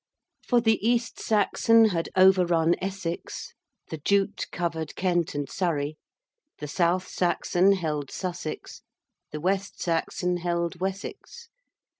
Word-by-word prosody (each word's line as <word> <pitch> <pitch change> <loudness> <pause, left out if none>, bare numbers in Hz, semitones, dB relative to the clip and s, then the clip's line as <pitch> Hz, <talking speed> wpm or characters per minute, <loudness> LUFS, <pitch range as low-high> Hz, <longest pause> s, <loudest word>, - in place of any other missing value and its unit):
For 245 - +4
the 225 -3 +2
East 235 0 0
Saxon 225 +1 +4
had 165 -4 -2
overrun 175 -3 +5
Essex, 190 -3 -5 0.4
the 160 - -4
Jute 200 +6 +1
covered 165 -3 -3
Kent 175 -4 0
and 145 -1 -2
Surrey, 155 -5 -1 0.6
the 150 - -6
South 175 +4 +1
Saxon 180 +1 +2
held 150 -7 -2
Sussex, 180 -4 -5 0.5
the 150 - -5
West 195 +4 -1
Saxon 180 +1 -1
held 170 0 -2
Wessex. 205 - -6
180 Hz, 115 wpm, -26 LUFS, 165-195 Hz, 0.6 s, overrun